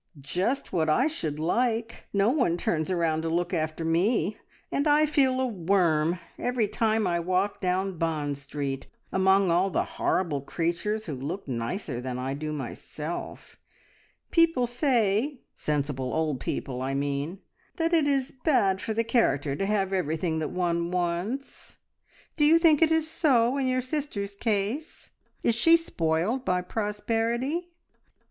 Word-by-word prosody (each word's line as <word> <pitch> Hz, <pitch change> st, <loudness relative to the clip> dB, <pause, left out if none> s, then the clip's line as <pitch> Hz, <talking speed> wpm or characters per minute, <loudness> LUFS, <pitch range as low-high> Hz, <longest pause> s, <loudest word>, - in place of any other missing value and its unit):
"Just 185 Hz, -, -2 dB
what 160 Hz, -3 st, +1 dB
I 240 Hz, -, +3 dB
should 160 Hz, -, -2 dB
like. 230 Hz, +7 st, -1 dB
No 200 Hz, +3 st, +3 dB
one 245 Hz, -, +2 dB
turns 160 Hz, 0 st, -1 dB
round 165 Hz, -3 st, +1 dB
to 165 Hz, -, -2 dB
look 175 Hz, +2 st, -1 dB
after 160 Hz, 0 st, -2 dB
me, 190 Hz, +6 st, +1 dB, 0.4 s
and 285 Hz, +2 st, +1 dB
I 300 Hz, +1 st, +5 dB
feel 270 Hz, -4 st, +2 dB
a 260 Hz, -, +2 dB
worm 175 Hz, -6 st, +1 dB, 0.2 s
every 245 Hz, -3 st, 0 dB
time 220 Hz, +1 st, +1 dB
I 170 Hz, -1 st, +1 dB
walk 185 Hz, +4 st, 0 dB
down 185 Hz, -1 st, -1 dB
Bond 150 Hz, -4 st, -1 dB
Street 140 Hz, -1 st, -4 dB, 0.2 s
among 190 Hz, -1 st, +3 dB
all 180 Hz, +3 st, +3 dB
the -, -, +1 dB
horrible 165 Hz, -7 st, -1 dB
creatures 175 Hz, +9 st, -2 dB
who 155 Hz, -, -4 dB
look 145 Hz, +9 st, -5 dB
nicer 125 Hz, -, -3 dB
than 125 Hz, 0 st, -4 dB
I 130 Hz, +1 st, -2 dB
do 155 Hz, +2 st, -4 dB
myself. 150 Hz, +3 st, -6 dB, 0.7 s
People 330 Hz, -7 st, +4 dB
say 245 Hz, 0 st, +1 dB
sensible 140 Hz, -3 st, -2 dB
old 155 Hz, -4 st, 0 dB
people, 125 Hz, 0 st, -3 dB
I 135 Hz, +1 st, -2 dB
mean 145 Hz, +6 st, -2 dB, 0.4 s
that 330 Hz, +1 st, 0 dB
it 315 Hz, -3 st, +4 dB
is 275 Hz, -1 st, 0 dB
bad 205 Hz, -, +3 dB
for 220 Hz, -, -3 dB
the 230 Hz, -, +2 dB
character 145 Hz, -, +1 dB
to 195 Hz, -, -1 dB
have 195 Hz, -2 st, 0 dB
everything 160 Hz, -2 st, 0 dB
that 155 Hz, -, -2 dB
one 170 Hz, -1 st, -1 dB
wants. 180 Hz, +9 st, -3 dB, 0.6 s
Do 300 Hz, -, +3 dB
you 320 Hz, +2 st, +7 dB
think 330 Hz, -3 st, +5 dB
it 325 Hz, -1 st, +5 dB
is 320 Hz, -1 st, +2 dB
so 270 Hz, -7 st, +3 dB
in 275 Hz, -2 st, 0 dB
your 255 Hz, 0 st, +1 dB
sister's 255 Hz, -7 st, -3 dB
case? 215 Hz, +7 st, -2 dB, 0.3 s
Is 235 Hz, -, +3 dB
she 330 Hz, +9 st, +5 dB
spoiled 185 Hz, -, -1 dB
by 180 Hz, -4 st, 0 dB
prosperity?" 230 Hz, -, -1 dB
190 Hz, 155 wpm, -27 LUFS, 160-245 Hz, 0.7 s, you